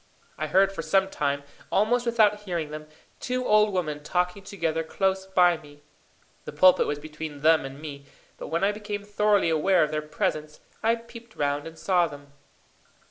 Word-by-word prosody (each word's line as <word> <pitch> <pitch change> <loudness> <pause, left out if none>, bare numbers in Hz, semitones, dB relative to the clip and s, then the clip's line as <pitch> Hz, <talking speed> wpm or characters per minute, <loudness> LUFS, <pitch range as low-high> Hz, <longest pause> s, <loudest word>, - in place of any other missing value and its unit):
I 155 - -3
heard 195 +5 +4
for 195 - -5
some 195 +3 +2
time, 140 -4 -2 0.3
almost 240 +4 +2
without 215 -3 +3
hearing 170 -7 -4
them, 155 0 -7 0.3
two 255 0 -2
old 210 -1 +4
women 155 -6 -2
talking 180 +5 -1
together 165 -5 -2
close 190 +3 -1
by 180 -2 +4
me. 145 -1 -17 0.6
The - - -6
pulpit 185 0 +5
was 145 - -2
between 150 -1 -8
them 160 -2 +4
and 135 +1 -8
me, 140 -2 -9 0.3
but - - -6
when 165 +3 -1
I 200 - +4
became 210 -1 -5
thoroughly 205 -3 +2
aware 170 +3 +3
of 150 - -1
their 155 0 -1
presence, 150 0 -3 0.2
I 225 +1 +3
peeped 235 0 -13
round 145 +1 -1
and 165 0 -11
saw 180 -2 +2
them. 145 -2 -13
175 Hz, 180 wpm, -26 LUFS, 150-205 Hz, 0.6 s, pulpit